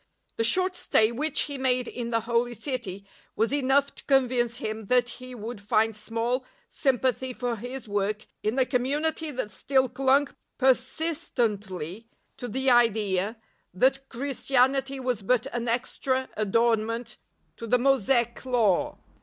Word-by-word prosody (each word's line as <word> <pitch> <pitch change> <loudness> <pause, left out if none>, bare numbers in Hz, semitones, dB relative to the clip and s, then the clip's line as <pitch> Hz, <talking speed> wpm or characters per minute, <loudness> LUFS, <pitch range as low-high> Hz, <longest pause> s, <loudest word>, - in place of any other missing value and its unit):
The 225 - +1
short 370 +10 +3
stay 220 -9 +2
which 295 +5 0
he 285 -2 -3
made 255 -1 +1
in 240 -1 -5
the 230 -1 +1
Holy 235 +1 0
City 225 -6 -4 0.3
was 225 +5 +1
enough 280 0 +2
to - - -13
convince 250 -3 +2
him 220 -2 -5
that 245 +1 +3
he 255 0 -8
would 225 -1 -7
find 215 +2 +2
small 230 +4 -2 0.2
sympathy 260 -1 0
for 245 -2 -2
his 245 +2 -7
work 205 +1 -1 0.2
in 215 +4 -1
a 260 - +4
community 295 +6 0
that 255 -7 -4
still 265 +6 +1
clung 270 +3 +2 0.3
per 265 -1 +6
sistently 230 - -3 0.3
to 245 - -5
the 265 +3 +1
idea 215 -3 +2 0.4
that 270 +6 +2
Christianity 270 +1 0
was 250 -4 -1
but 240 +4 +1
an 240 0 -2
extra 260 +2 -1
adornment 230 +2 0 0.4
to 230 - -7
the 250 +3 +4
Mosaic 240 -2 +2
Law. 245 +2 +1
245 Hz, 145 wpm, -27 LUFS, 225-265 Hz, 0.4 s, per